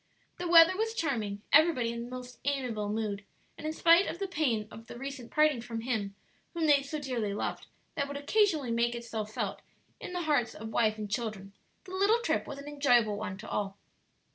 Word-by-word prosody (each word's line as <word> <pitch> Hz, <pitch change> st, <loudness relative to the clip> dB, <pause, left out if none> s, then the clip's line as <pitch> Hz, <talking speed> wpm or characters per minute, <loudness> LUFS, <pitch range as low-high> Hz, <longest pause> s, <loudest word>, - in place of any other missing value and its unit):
The 355 Hz, -, -2 dB
weather 335 Hz, +1 st, +8 dB
was 445 Hz, +2 st, -1 dB
charming, 215 Hz, -, -2 dB
everybody 295 Hz, -7 st, +5 dB
in 235 Hz, +1 st, -6 dB
most 250 Hz, -1 st, -8 dB
amiable 250 Hz, -7 st, -1 dB
mood, 210 Hz, -2 st, -2 dB, 0.3 s
and 310 Hz, +1 st, -4 dB
spite 340 Hz, +4 st, +5 dB
of -, -, -4 dB
the 390 Hz, +1 st, -3 dB
pain 250 Hz, -, 0 dB
of 225 Hz, +1 st, -11 dB
the -, -, -9 dB
recent 270 Hz, -2 st, -7 dB
parting 305 Hz, -5 st, +3 dB
from 230 Hz, -1 st, -5 dB
him 220 Hz, -5 st, -2 dB, 0.4 s
whom 330 Hz, -1 st, 0 dB
they 290 Hz, -2 st, +5 dB
so 280 Hz, +3 st, -5 dB
dearly 240 Hz, -8 st, -2 dB
loved, -, -, -3 dB, 0.3 s
that 280 Hz, -3 st, -1 dB
would 285 Hz, 0 st, -5 dB
occasionally 305 Hz, -, +2 dB
make 235 Hz, +1 st, +1 dB
itself 225 Hz, -3 st, -5 dB
felt -, -, -3 dB, 0.4 s
in -, -, -7 dB
the 355 Hz, -1 st, -2 dB
hearts 290 Hz, -7 st, +1 dB
of 220 Hz, +1 st, -7 dB
wife 220 Hz, -1 st, +2 dB
and 210 Hz, -1 st, -6 dB
children, 210 Hz, -4 st, -3 dB, 0.3 s
the 370 Hz, -, -12 dB
little 400 Hz, +5 st, +3 dB
trip 480 Hz, -, 0 dB
was -, -, -6 dB
an 280 Hz, +1 st, -9 dB
enjoyable 245 Hz, -7 st, +3 dB
one 190 Hz, -3 st, -5 dB
to 215 Hz, -, -10 dB
all. 195 Hz, -1 st, -3 dB
250 Hz, 195 wpm, -30 LUFS, 220-310 Hz, 0.4 s, weather